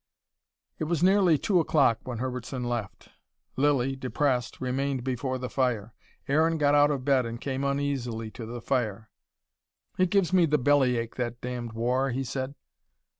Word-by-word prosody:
It - - -1
was 170 +1 0
nearly 185 -4 +5
two 185 +4 +2
o'clock 140 -8 +3
when 125 -3 -4
Herbertson 125 +1 -4
left. 120 -6 -4 0.5
Lilly, 135 -1 +2
depressed, 130 -1 -1
remained 130 0 -1
before 130 0 -2
the 125 0 -4
fire. 120 -4 -1 0.3
Aaron 160 +3 +2
got 145 -1 +3
out 145 0 +5
of 135 -3 -2
bed 135 -4 +3
and 115 0 -6
came 135 0 -3
uneasily 135 -6 -2
to 115 -1 -8
the 120 +1 -6
fire. 110 -5 -2 0.9
"It 185 -1 +3
gives 190 -3 +2
me 180 -3 +5
the 150 0 +3
bellyache, 125 -4 +2
that 120 -1 -3
damned 120 -2 -5
war," 125 +4 0
he 130 +2 -2
said. 130 +2 -4
130 Hz, 160 wpm, -27 LUFS, 120-145 Hz, 0.9 s, nearly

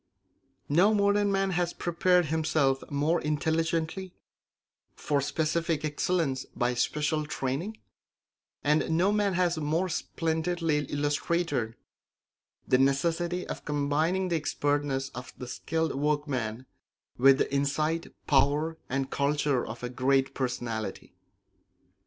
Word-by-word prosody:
No 185 +9 +4
modern 205 0 +3
man 195 0 +1
has 175 -1 0
prepared 180 +1 +2
himself 155 -3 +1
more 150 +4 +1
intelligently 160 +4 -1 0.8
for 145 -2 0
specific 155 +2 0
excellence 150 -3 0
by 125 +1 +1
special 150 +4 0
training, 150 +11 -3 0.9
and 150 +1 +2
no 185 +4 +3
man 205 -2 +1
has 175 -2 +1
more 160 +5 0
splendidly 165 -1 -1
illustrated 145 -4 -1 0.9
the 130 - +4
necessity 170 +6 +1
of - - -6
combining 155 +6 0
the 170 - +1
expertness 145 -3 -1
of 125 0 -9
the 125 - -6
skilled 160 +5 -2
workman 135 -5 -1 0.5
with 135 +1 +7
the - - -1
insight, 155 +4 0 0.2
power, 145 +3 +2
and 135 +1 -2
culture 145 -2 +1
of 115 +2 -7
a 125 - -2
great 135 +2 +1
personality. 120 -4 -4
150 Hz, 110 wpm, -28 LUFS, 135-170 Hz, 0.9 s, with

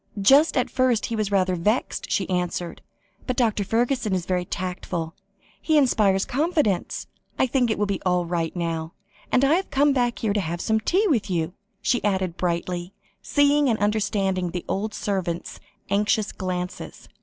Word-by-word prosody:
"Just 275 +10 +5
at 255 - +1
first 255 -4 +2
he 230 - -3
was 215 -2 -1
rather 185 -2 +2
vexed," 210 +8 -1
she 190 - 0
answered, 180 -2 -2 0.5
"but 255 - -1
Dr. 220 -5 +2
Fergusson 235 0 0
is 180 -2 -2
very 180 -1 -1
tactful; 175 -2 -4 0.5
he 315 -1 +2
inspires 210 -8 +3
confidence. 290 - 0 0.3
I - - +3
think 250 -1 +1
it 220 - 0
will 210 - +1
be 200 -2 -2
all 180 -1 +1
right 165 -1 -2
now. 165 -1 -3 0.4
And 255 +2 +4
I 280 - +4
have 375 +3 0
come 285 +1 +3
back 245 -3 +1
here 215 -3 0
to 205 - +1
have 170 0 -3
some 220 +4 +1
tea 370 - +1
with 235 - +1
you," 170 -1 -1 0.3
she 245 - +1
added 190 -4 0
brightly, 175 +1 -2 0.3
seeing 285 -1 +3
and 225 - +2
understanding 200 -3 0
the 175 0 -5
old 210 +2 -2
servant's 185 -4 -3 0.3
anxious 210 +1 +1
glances. 180 -1 -5
200 Hz, 170 wpm, -24 LUFS, 180-245 Hz, 0.5 s, Just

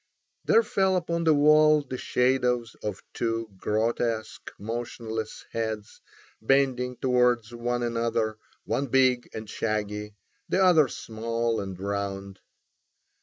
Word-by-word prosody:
There 455 +1 +5
fell 190 - +1
upon 170 -1 -1
the 160 - +6
wall 150 +1 +5
the 130 -2 -6
shadows 125 -2 +1
of 105 -3 -5
two 115 -1 -2
grotesque, 110 +2 -1
motionless 110 0 -5
heads 110 -2 -4 0.4
bending 125 0 +2
towards 125 -2 +2
one 120 +1 -2
another, 115 -2 -1 0.3
one 140 - -1
big 130 -1 +3
and 110 0 -7
shaggy, 105 -1 -3 0.3
the 190 - +3
other 165 -6 +6
small 115 0 -2
and 95 -2 -7
round. 100 -1 -4
115 Hz, 115 wpm, -27 LUFS, 110-130 Hz, 0.4 s, the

